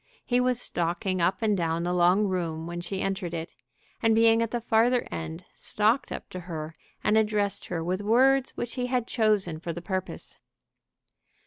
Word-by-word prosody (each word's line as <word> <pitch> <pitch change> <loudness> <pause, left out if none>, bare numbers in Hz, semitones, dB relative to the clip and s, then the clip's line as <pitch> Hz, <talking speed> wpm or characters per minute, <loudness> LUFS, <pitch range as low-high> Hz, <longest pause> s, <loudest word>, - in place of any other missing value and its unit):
He 245 0 +2
was 250 -1 +2
stalking 175 -1 -1
up 185 +6 +1
and 210 -2 +3
down 165 -2 -1
the 175 +1 -1
long 180 +4 +4
room 170 -4 -2
when 175 0 -5
she 190 +2 -4
entered 190 -3 -2
it, 165 +1 -5 0.5
and 225 -1 +4
being 225 0 +5
at 230 - 0
the 240 - -2
farther 235 +2 +2
end, 160 +2 -6
stalked 220 +5 +1
up - - -6
to 185 - -5
her 165 -3 -6 0.3
and 215 +1 +4
addressed 210 -2 0
her 165 -2 -3
with 185 +3 -1
words 260 +5 +3
which 240 -1 -4
he 250 -1 -2
had 250 -2 0
chosen 210 -9 +1
for 170 0 -4
the 175 - -6
purpose. 185 0 -5
195 Hz, 185 wpm, -27 LUFS, 175-225 Hz, 0.5 s, being